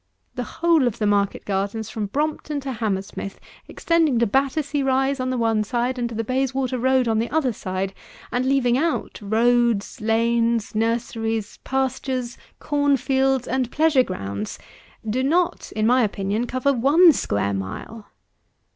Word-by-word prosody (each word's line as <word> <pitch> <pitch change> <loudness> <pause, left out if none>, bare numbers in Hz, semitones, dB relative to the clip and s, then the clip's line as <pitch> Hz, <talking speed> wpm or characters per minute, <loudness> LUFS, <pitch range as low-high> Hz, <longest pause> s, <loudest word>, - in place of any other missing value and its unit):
The 250 - -4 0.2
whole 325 -6 +5
of 235 -1 -2
the 215 - -1
market 200 -1 +1
gardens 200 +2 -2
from 210 -2 -3
Brompton 300 +4 -2
to 270 0 -4
Hammersmith, 200 -4 -4 0.3
extending 325 -6 +1
to 235 - +3
Battersea 280 +5 0
Rise 270 +1 +1
on 255 0 -1
the 255 - -1
one 225 -2 +1
side, 245 +4 -1
and 240 -1 -1
to 230 - -7
the 225 - -1
Bayswater 260 +1 -1
road 260 0 +2
on 220 -1 +1
the 230 - -1
other 290 -6 +1
side, 190 -1 -3 0.4
and 245 +1 0
leaving 260 -2 +2
out 325 -6 -2
loads, 230 0 +1
lanes, 230 0 +1
nurseries; 225 -1 -2
pastures, 260 -2 -2 0.2
corn 285 -1 +1
fields, 265 0 +1
and 255 -1 -1
pleasure 305 -1 +3
grounds, 100 - -4 0.5
do 235 +5 0
not, 345 +6 0
in 215 0 +1
my 250 +3 +4
opinion, 205 +2 -1
cover 255 +3 +1
one 295 +8 +6
square 100 - -1
mile. 100 - -6
245 Hz, 155 wpm, -23 LUFS, 220-270 Hz, 0.5 s, one